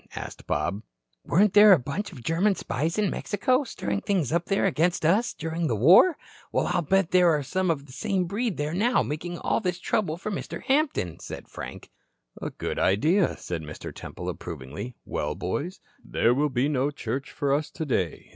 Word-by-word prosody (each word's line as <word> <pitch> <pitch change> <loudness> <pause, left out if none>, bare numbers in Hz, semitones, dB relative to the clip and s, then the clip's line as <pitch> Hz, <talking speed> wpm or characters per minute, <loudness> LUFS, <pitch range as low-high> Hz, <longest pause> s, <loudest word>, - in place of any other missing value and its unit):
asked - - -8
Bob. 100 +4 -1 0.4
"Weren't 200 +2 +3
there 210 -1 +9
a - - +6
bunch 145 +10 -4
of 125 - -11
German 185 - +2
spies 160 - -2
in 210 -2 +1
Mexico, 255 +7 +1
stirring 100 - -3
things 185 -10 0
up 170 +1 +1
there 195 - +1
against 165 +3 +1
us, 200 +9 +3
during 165 +1 -3
the 120 - 0
war? 180 - +6 0.3
Well, - - +1
I'll 175 0 +1
bet 190 +2 +1
there 180 -1 +5
are 150 -3 +2
some 185 +6 -1
of 145 -4 -1
the 135 - -15
same 190 - -1
breed 210 +3 -2
there 150 +2 -2
now 230 +7 +2
making 175 +4 -4
all - - 0
this 180 -5 -2
trouble 175 -4 -1
for 215 +4 -5
Mr. 195 - -5
Hampton," 270 - 0
said - - -8
Frank. - - -9 0.5
"A - - -3
good - - -4
idea," 160 - +2
said 85 -2 -5
Mr. 75 0 -8
Temple, - - -8
approvingly. 80 - -6
"Well, 75 0 -2
boys, 145 - -3 0.2
there 115 - +2
will 145 +3 +1
be 130 +1 +1
no 140 -1 +1
church 135 -1 -4
for 140 -1 -1
us 150 +1 0
today. 120 - -2
165 Hz, 190 wpm, -26 LUFS, 130-195 Hz, 0.5 s, there